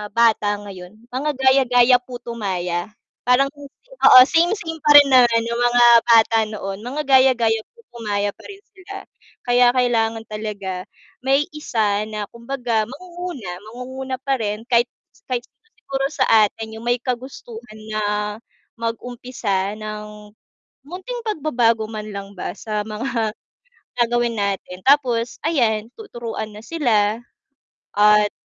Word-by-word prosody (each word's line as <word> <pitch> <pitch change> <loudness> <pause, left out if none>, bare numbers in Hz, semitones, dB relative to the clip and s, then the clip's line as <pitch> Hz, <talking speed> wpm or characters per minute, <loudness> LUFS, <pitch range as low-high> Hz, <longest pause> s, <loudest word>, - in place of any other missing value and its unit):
bata 220 -3 +3
ngayon, 185 -1 -10 0.2
mga 275 +4 -1
gaya-gaya, 260 -2 +4
puto 245 -1 -9
maya. 180 -4 -2 0.4
Parang 260 +2 +4
oo 285 - +4
same-same 335 0 0
pa 295 - +5
rin 285 -1 +7
naman 240 -2 +5
yung 235 0 -2
mga 240 0 +4 0.2
bata 230 -1 +5
noon 195 -2 -6
mga 275 +5 -3
gaya-gaya, 255 -4 +4 0.2
puto 465 - -17
maya 205 -1 0
pa - - -19
rin 400 0 -11
sila. 395 -1 -11 0.5
Kaya 245 0 +5
kailangan 225 -3 +1
talaga 205 -4 -5 0.4
may 275 +2 +3
isa 215 -8 0
na, 210 -1 -4
kumbaga 235 -2 -2
mangunguna, 345 - -7 0.2
mangunguna 260 +2 -6
pa 270 0 0
rin 210 -1 -3
kahit 240 0 +4 0.4
kahit 250 -2 -1
siguro 450 0 -41
siguro 270 -10 -3
sa - - +1 0.2
atin 220 +2 -9
yung 230 - -11
may 245 0 +2
kagustuhan 240 -3 -7
na 215 0 -1 0.8
mag-umpisa 230 -4 -3
ng 210 0 -8 0.6
munting 425 +9 -6
pagbabago 245 - +1
man 215 -1 -6
lang 200 0 -7
ba - - -4
sa 215 -2 -3
mga 225 0 -2 0.7
gagawin 240 0 0
natin 195 -2 -3
tapos 250 -4 +2
ayan 225 -9 +1
tuturuan 230 - -6
na 210 - -10
sila, 225 -9 +1 0.8
at 210 0 +5
235 Hz, 130 wpm, -21 LUFS, 215-265 Hz, 0.8 s, rin